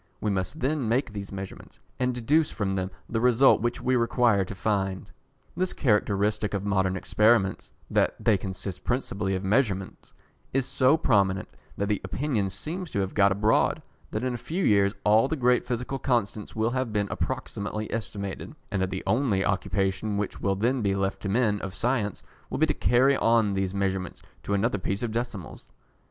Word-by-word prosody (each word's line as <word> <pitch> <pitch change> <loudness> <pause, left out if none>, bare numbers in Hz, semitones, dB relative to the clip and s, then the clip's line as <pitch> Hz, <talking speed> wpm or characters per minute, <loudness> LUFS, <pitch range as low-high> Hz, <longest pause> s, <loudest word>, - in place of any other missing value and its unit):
We 105 - 0
must 95 - -3
then 135 -3 0
make 120 -1 0
these 100 -1 -6
measurements, 95 -1 -8 0.2
and 125 0 +1
deduce 145 +6 +2
from 100 -2 -2
them 95 -1 -1 0.2
the 115 -1 -1
result 125 0 +5
which 120 +1 -1
we 130 - +2
require 115 -4 +3
to 95 +2 -7
find. 95 -1 -1 0.4
This 185 +1 -1
characteristic 105 -3 +1
of 100 0 -3
modern 95 -1 +1
experiments 105 -1 +2 0.2
that - - +2
they 110 - +3
consist 95 0 -5
principally 100 -6 -1
of 95 - -3
measurements, 100 -2 0 0.4
is 135 -1 +2
so 135 +2 +3
prominent, 100 -10 +2 0.3
that 100 - 0
the 105 -1 -1
opinion 125 -9 -1
seems 160 - -5
to 100 - -2
have 95 -1 -2
got 100 -1 +4
abroad, 105 +3 +2 0.3
that 110 - -3
in 130 -1 0
a - - -3
few 170 +10 -2
years 100 -1 +4
all 110 +4 +5
the 160 - -1
great 125 -3 +2
physical 125 +2 -3
constants 115 -5 -1
will 110 +1 +1
have 130 -2 -1
been 105 -1 0
approximately 105 +1 -3
estimated, 100 -3 -5 0.2
and 95 - 0
that 95 - 0
the 95 0 -4
only 110 -3 +1
occupation 95 +1 0
which 105 -1 -3
will 100 -1 +1
then 120 +6 +1
be 100 -2 +1
left 95 0 -1
to 100 - -3
men 105 -1 +2
of 95 -1 -6
science 115 -5 -1 0.3
will - - -3
be - - +4
to - - 0
carry 130 +3 +3
on 115 -3 +3
these 95 0 -1
measurements 95 -2 -2 0.2
to 100 - -1
another 105 +1 +1
place 100 +4 -2
of 115 - -1
decimals. 115 -6 -5
105 Hz, 185 wpm, -27 LUFS, 95-125 Hz, 0.4 s, result